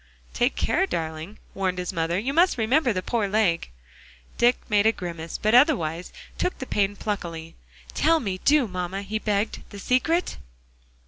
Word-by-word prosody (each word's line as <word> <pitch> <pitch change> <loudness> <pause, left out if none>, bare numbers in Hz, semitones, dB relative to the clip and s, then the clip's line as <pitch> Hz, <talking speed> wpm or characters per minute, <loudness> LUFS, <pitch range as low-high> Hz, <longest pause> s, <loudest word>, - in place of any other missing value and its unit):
"Take - - +1
care, - - +1
darling," 160 +3 -4 0.2
warned 185 -2 -1
his 180 +1 -3
mother. 165 0 0
"You 250 +8 -2
must 345 +1 +4
remember 245 +4 +2
the 185 -3 -2
poor 230 -4 0
leg." 195 - +1 0.7
Dick 240 +1 +4
made 210 -1 +3
a - - +6
grimace, 170 -5 -6
but 215 +1 0
otherwise 200 - +3 0.3
took 365 - -1
the 260 - -6
pain 205 -4 0
pluckily. 170 -6 -5 0.4
"Tell 325 +2 +3
me, 195 -8 -3
do, 290 -4 +4
mamma," 185 +1 -4
he 215 +2 -3
begged, 210 0 -1
"the 205 - -10
secret." 290 - 0
205 Hz, 165 wpm, -25 LUFS, 180-240 Hz, 0.7 s, a